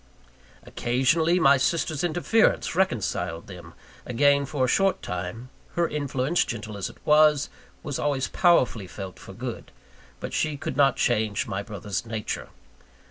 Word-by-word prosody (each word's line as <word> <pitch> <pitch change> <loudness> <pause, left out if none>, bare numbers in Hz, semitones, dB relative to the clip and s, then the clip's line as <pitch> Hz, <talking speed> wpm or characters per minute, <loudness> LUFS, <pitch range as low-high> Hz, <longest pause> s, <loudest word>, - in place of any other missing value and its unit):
Occasionally, 160 +8 +1
my 140 -4 +6
sister's 155 +2 0
interference 175 +6 +2
reconciled 115 - -1
them 90 -3 -11 0.3
again 140 +3 +2
for 135 -2 0
a - - -1
short 195 +8 +2
time; 90 +8 -5 0.3
her 170 -1 +2
influence, 145 +1 0
gentle 110 -2 -6
as 100 - -4
it - - -15
was, 150 -1 +5 0.3
was 145 -3 -4
always 140 -3 0
powerfully 125 - +2
felt 95 0 -8
for - - -11
good, - - -7 0.5
but - - -6
she 155 -2 0
could 135 - -4
not 135 0 +4
change 110 -3 0
my 100 -2 -3
brother's 100 -2 -5
nature. 110 -2 -5
130 Hz, 140 wpm, -25 LUFS, 105-155 Hz, 0.5 s, my